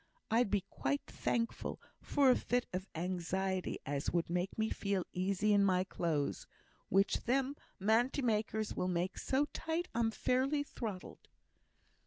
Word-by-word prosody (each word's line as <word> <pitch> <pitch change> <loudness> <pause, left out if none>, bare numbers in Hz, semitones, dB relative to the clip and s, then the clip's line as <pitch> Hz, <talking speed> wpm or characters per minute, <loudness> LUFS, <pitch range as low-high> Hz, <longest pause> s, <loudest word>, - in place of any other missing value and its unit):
I'd 230 -1 +4
be 205 -1 +2
quite 140 +2 -1
thankful 230 -1 -2 0.2
for 275 -3 +4
a - - +5
fit 245 0 0
of 185 +2 -3
anxiety 185 +2 -1
as 140 0 -1
would 170 0 0
make 180 +2 -1
me 220 0 0
feel 200 -3 -1
easy 195 +3 +2
in 200 -1 +5
my 185 -2 +3
clothes, 160 -6 -1 0.4
which 195 +1 +2
them 270 +3 +1 0.2
manty 235 +7 +2
makers 215 -2 0
will 180 - -1
make 180 0 -1
so 270 +2 +2
tight 330 +2 -2
I'm 230 0 +2
fairly 265 +6 +1
throttled." 215 -9 -6
200 Hz, 145 wpm, -35 LUFS, 185-245 Hz, 0.4 s, a